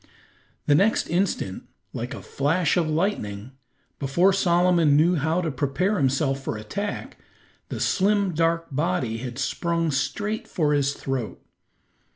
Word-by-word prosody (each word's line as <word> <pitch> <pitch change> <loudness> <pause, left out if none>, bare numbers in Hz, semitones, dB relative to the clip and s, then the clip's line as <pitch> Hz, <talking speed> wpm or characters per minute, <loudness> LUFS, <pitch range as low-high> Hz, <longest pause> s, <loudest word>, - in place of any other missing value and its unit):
The 145 - +4
next 195 +9 +3
instant, 170 - -1 0.3
like - - -4
a - - -9
flash 150 +4 +1
of 170 -3 +1
lightning, 130 - -2 0.5
before 170 +8 +3
Solomon 175 -5 +3
knew 165 +4 +4
how 160 +2 +1
to 165 -3 -2
prepare 145 +10 0
himself 135 0 +1
for 110 - -3
attack, 200 - -5 0.5
the - - -4
slim, 200 -1 +2
dark 165 +1 +1
body 145 -6 -1
had 125 0 -6
sprung 165 +4 -1
straight 205 +10 -2
for 150 -3 0
his 140 -1 +1
throat. 130 -4 -4
160 Hz, 135 wpm, -24 LUFS, 135-180 Hz, 0.5 s, The